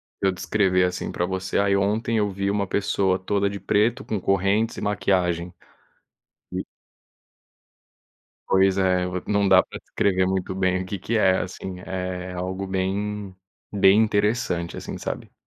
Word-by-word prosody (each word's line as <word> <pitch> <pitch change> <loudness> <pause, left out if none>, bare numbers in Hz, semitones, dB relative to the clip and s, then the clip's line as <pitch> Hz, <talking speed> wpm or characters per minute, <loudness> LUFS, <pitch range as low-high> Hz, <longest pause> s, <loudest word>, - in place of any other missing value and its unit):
se - - -5
eu 95 - +3
descrever 90 -1 +1
assim 90 0 -2
pra 90 - -1
você: 95 0 -2
"Aí 100 0 +3
ontem 105 +4 0
eu 105 -1 +2
vi 100 +1 -2
uma 100 0 0
pessoa 95 -1 +1
toda 100 +1 0
de 100 0 -6
preto 120 +6 +1
com 105 -3 -2
correntes 100 +4 +1
e - - -5
maquiagem." 90 -4 0 1.0
E. - - -2 1.8
Pois 95 0 +4
é, 90 -1 +2
v 90 0 -4
não 100 -1 +2
dá 95 -1 +7
pra - - -9
descrever 95 -2 0
muito 95 0 -1
bem 95 -1 +1
o 95 - -8
que 100 +1 -4
que 115 +6 -2
é 95 -3 +4
assim, 90 0 -5
é 90 0 -4
algo 95 +2 -4
bem 95 +1 -2 0.4
bem 100 0 +5
interessante, 105 -5 0
assim, - - -6
sabe? - - -5
95 Hz, 160 wpm, -24 LUFS, 95-100 Hz, 1.8 s, dá